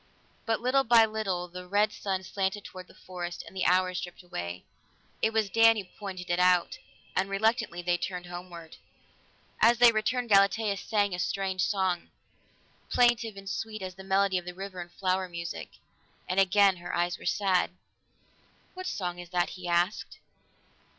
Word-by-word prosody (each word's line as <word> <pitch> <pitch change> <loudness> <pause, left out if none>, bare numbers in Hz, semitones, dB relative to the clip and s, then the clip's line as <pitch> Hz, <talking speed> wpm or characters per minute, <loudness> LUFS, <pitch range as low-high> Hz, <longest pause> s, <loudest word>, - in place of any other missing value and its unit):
But 225 0 0
little 260 +3 +3
by 230 -2 +6
little 200 -5 -2
the 180 +1 -9
red 205 +3 +2
sun 190 -2 -3
slanted 195 +2 -2
toward 185 -1 -10
the - - -18
forest, 175 -2 -6
and - - -13
the 185 - +1
hours 185 0 +2
dripped 175 +1 -9
away. 85 - -6 0.6
It 220 - +2
was 220 -2 +1
Dan 225 +2 +5
who 205 - -2
pointed 185 -2 -7
it 175 - +1
out, 180 -1 +3 0.4
and 190 +1 +1
reluctantly 215 -3 0
they 175 0 +1
turned 180 0 -4
homeward. 175 -2 -9 0.8
As 235 +1 +6
they 240 0 +8
returned, 235 +3 -1
Galatea 200 +1 +4
sang 205 -1 0
a 180 - -3
strange 190 0 -1
song, 190 -3 0 0.8
plaintive 240 -3 +2
and 195 0 -10
sweet 215 +2 -4
as 185 -1 -5
the 190 +1 -12
medley 195 -1 +2
of 180 - -14
river 190 -2 -6
and 175 0 -9
flower 185 0 -1
music. 170 - -6 0.6
And 185 +2 +1
again 195 0 +5
her 175 - -5
eyes 175 0 0
were - - -12
sad. 190 -3 +2 1.0
"What 370 0 -6
song 175 - -3
is 175 -1 -9
that?" 175 -1 0
he 185 -1 -8
asked. 175 +4 0
190 Hz, 170 wpm, -29 LUFS, 180-210 Hz, 1.0 s, they